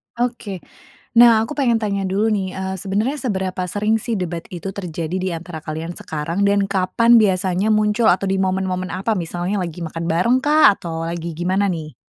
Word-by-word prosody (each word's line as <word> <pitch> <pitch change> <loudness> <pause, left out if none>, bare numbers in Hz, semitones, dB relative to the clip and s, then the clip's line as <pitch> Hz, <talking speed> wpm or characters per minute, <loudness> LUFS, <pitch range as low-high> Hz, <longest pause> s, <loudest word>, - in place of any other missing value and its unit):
Oke. 235 -6 -3 0.6
Nah, 230 -2 +7
aku 245 +7 -4
pengen 245 -6 +2
tanya 200 -3 -2
dulu 200 +3 +1
nih, 195 -3 -1
eee, 190 0 -3
sebenarnya 215 +9 -1
seberapa 190 -7 -2
sering 210 +3 +1
sih 235 -2 -2
debat 170 -2 -3
itu 185 +1 -5
terjadi 170 -2 -4
di 185 - -1
antara 165 -1 -6
kalian 160 +3 -5
sekarang 160 +6 -3
dan 200 0 +2
kapan 210 +5 +3
biasanya 190 -1 +1
muncul 215 +1 +2
atau 185 +2 +1
di 195 0 0
momen-momen 185 0 -1
apa? 195 +4 -1
Misalnya 175 +3 -2
lagi 170 -1 -6
makan 165 +1 -5
barengkah? 250 - +4
Atau 165 -3 -5
lagi 170 0 -4
gimana 190 +3 +1
nih? 155 -5 -5
190 Hz, 175 wpm, -20 LUFS, 175-215 Hz, 0.6 s, Nah